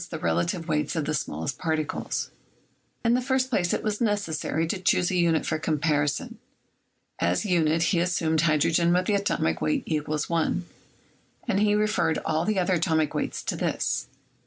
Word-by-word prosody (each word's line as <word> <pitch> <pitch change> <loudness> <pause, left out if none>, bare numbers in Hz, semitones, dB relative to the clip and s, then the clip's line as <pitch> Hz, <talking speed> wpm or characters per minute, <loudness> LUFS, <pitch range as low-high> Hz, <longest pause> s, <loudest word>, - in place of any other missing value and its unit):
the - - -4
relative 170 - -1
weights 150 -1 0
of 160 -3 -1
the 155 - -1
small 80 - -3
est - - -3
particles? 160 -3 -2 0.7
In 230 - +4
the 250 - +2
first 260 0 0
place 175 -7 +1
it - - -1
was 210 0 -2
necessary 200 -7 0
to 185 +4 -2
choose 185 -1 +2
a - - 0
unit 170 -2 +2
for 155 - -1
comparison. 155 - 0 0.8
As - - +1
unit 165 -4 +2
he 170 0 +2
assumed 165 -3 +1
hydrogen 165 +2 +3
with 180 +1 +2
the 210 - +1
atomic 140 - 0
weight 155 - 0 0.2
= 150 0 -1
1, 170 +1 0 0.8
and 200 -4 +1
he 210 0 +3
referred 210 -6 +1
all 160 +2 0
the 215 -1 0
other 185 0 +2
atomic 160 -3 +1
weights - - -3
to - - -2
this. - - -1
170 Hz, 175 wpm, -26 LUFS, 155-200 Hz, 0.8 s, In